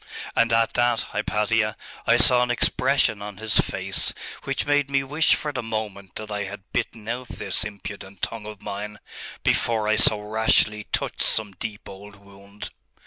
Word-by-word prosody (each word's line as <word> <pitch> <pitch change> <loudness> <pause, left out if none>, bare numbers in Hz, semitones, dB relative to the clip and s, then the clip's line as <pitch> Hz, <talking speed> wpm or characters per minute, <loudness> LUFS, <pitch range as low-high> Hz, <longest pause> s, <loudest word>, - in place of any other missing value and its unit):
And 115 - +3
at 115 0 +2
that, 120 -1 +2
Hypatia, 105 +1 0 0.3
I 120 - +5
saw 125 -1 +7
an 125 - +1
expression 125 -2 +2
on 100 -1 -7
his 110 0 +2
face 95 0 +2 0.3
which 135 -1 -1
made 145 -1 +2
me 135 -1 +1
wish 150 +4 +3
for 150 -1 -4
the 130 - -3
moment 110 -4 -5
that 110 0 -7
I 105 -1 -2
had 100 0 -8
bitten 110 -2 -3
out 125 +2 -4
this - - -1
impudent 100 -2 -9
tongue 110 -2 -3
of 105 -2 -10
mine, 105 +1 -6 0.5
before 110 -2 +1
I 110 - +2
so 105 - +5
rashly 105 0 +2
touched - - -2
some 110 -2 +2
deep 100 +2 -7
old 100 +1 -11
wound.... 100 +1 -12
110 Hz, 170 wpm, -24 LUFS, 105-120 Hz, 0.5 s, saw